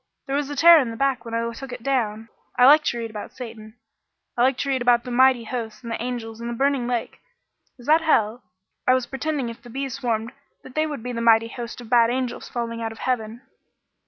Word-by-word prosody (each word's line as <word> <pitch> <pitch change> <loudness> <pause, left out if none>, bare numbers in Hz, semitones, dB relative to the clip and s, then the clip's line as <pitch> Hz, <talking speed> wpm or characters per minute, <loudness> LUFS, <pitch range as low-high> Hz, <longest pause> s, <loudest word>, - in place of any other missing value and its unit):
There 275 - -2
was 290 -1 -1
a 290 - -4
tear 335 +3 +8
in 255 -5 -1
the 225 - -7
back 275 -1 0
when 230 0 -4
I 230 0 -1
took 265 +3 -8
it 245 -2 -8
down. 225 -5 -1 0.3
I 250 - +6
like 300 +3 +7
to 240 - 0
read 230 -1 -5
about 210 -1 -8
Satan. 225 -3 -9 0.6
I 240 - 0
like 255 +1 +3
to 275 - -2
read 265 -2 0
about 240 -1 +4
the 250 - -7
mighty 255 -1 +4
hosts 225 -1 -6
and 235 - -6
the 230 - -3
angels 230 -2 -5
and 235 - -4
the 235 - -4
burning 275 -1 +1
lake. 240 -2 -3 0.6
Is 245 - -14
that 310 +3 +4
hell? 235 -7 +2 0.5
I 255 - +6
was 255 -1 0
pretending 275 -1 -3
if 230 - -10
the 240 - -13
bees 270 +2 -4
swarmed 235 -4 -2 0.3
that 260 - -12
they 310 +2 +1
would 290 -7 -6
be 250 - -4
the 230 -1 -3
mighty 230 0 +4
host 240 0 -7
of 235 - -12
bad 235 -1 +5
angels 250 0 -3
falling 230 -1 -4
out 225 0 -3
of 225 - -11
heaven." 230 -1 -2
240 Hz, 245 wpm, -23 LUFS, 230-265 Hz, 0.6 s, tear